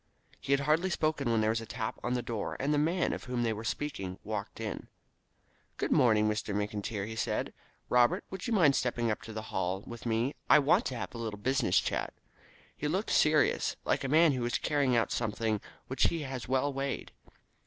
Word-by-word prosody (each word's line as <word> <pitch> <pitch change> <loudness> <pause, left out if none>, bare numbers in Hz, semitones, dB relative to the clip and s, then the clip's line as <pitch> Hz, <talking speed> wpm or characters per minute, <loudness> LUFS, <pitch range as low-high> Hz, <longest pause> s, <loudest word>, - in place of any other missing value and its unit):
He - - -5
had 140 0 +4
hardly 155 +6 +2
spoken 155 -6 0
when 115 -1 +2
there 110 0 +2
was 115 0 -1
a 115 - -8
tap 110 +2 -4
at 120 - 0
the 125 - -1
door, 115 -3 -3
and 140 +3 +1
the 145 - +3
man 170 +4 +1
of - - -6
whom 125 -1 -1
they 115 -1 +1
were 110 +1 -6
speaking 100 -7 -3
walked 105 -1 -5
in. - - -5 0.9
"Good - - -2
morning, 110 -3 +4
Mr. 105 -1 -1
McIntyre," 105 +1 -3
said 115 - -1
he. - - -24 0.3
"Robert, 125 -1 +3
would 190 +3 -5
you - - -2
mind 160 -11 +5
stepping 120 -2 0
up 105 - -3
to 115 - -9
the 110 0 -7
Hall 95 +1 -1
with 120 -1 -7
me? 115 +5 +1 0.2
I - - +9
want 145 -2 +3
to 130 - -4
have - - -5
a 115 - -7
little 110 -3 -4
business 125 -2 +2
chat." - - -2 0.6
He 150 - -3
looked 190 +8 -1
serious, 150 -1 +3
like - - +1
a - - -1
man 155 +3 +5
who 130 -3 -2
is 120 - 0
carrying 140 -4 +1
out 115 - +2
something 110 -2 -1 0.2
which 130 - +1
he 165 -2 0
has 130 -3 -5
well 135 +2 +1
weighed. 135 0 -3
120 Hz, 215 wpm, -31 LUFS, 110-145 Hz, 0.9 s, I